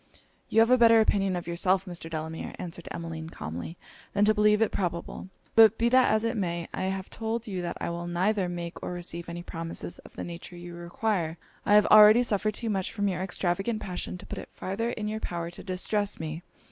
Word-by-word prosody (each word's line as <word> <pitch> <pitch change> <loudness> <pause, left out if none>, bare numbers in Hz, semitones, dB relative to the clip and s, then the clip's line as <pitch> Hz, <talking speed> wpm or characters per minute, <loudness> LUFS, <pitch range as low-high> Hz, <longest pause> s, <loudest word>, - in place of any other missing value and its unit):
'You 225 - +5
have 230 +2 +4
a 255 - +6
better 230 -1 +7
opinion 195 -3 +2
of 175 - -4
yourself, 180 +2 +1
Mr. 175 -3 -6
Delamere,' 160 0 -5
answered 175 -1 -7
Emmeline, 165 -1 -6
calmly, 85 - -6 0.4
'than 205 +1 +3
to 215 - +5
believe 210 0 +4
it 225 - +2
probable. 175 0 -3 0.3
But 225 -1 +7
be 235 +1 +2
that 255 +1 +5
as 215 0 +2
it 230 +1 0
may, 170 -5 -2
I - - -2
have 190 0 -3
told 225 +1 -3
you 190 -5 -3
that 175 - -4
I - - -2
will 170 0 -4
neither 185 +2 +1
make 170 -1 -6
or - - -4
receive 170 -1 -5
any 170 0 -6
promises 165 0 -5
of - - -15
the - - -5
nature 175 +1 -8
you 175 0 -9
require. 175 -1 -2 0.3
I 205 - +6
have 210 -1 +7
already 215 +3 +8
suffered 215 -2 0
too 230 - -2
much 190 -2 -1
from 205 -2 0
your 180 -1 -2
extravagant 195 +4 -1
passion 180 -2 -5
to - - -11
put - - -6
it - - -9
farther 215 +5 -3
in 215 -3 -3
your 215 +1 -3
power 170 -4 -4
to - - -9
distress 200 +2 -1
me. 160 +1 -5
185 Hz, 220 wpm, -28 LUFS, 170-215 Hz, 0.4 s, already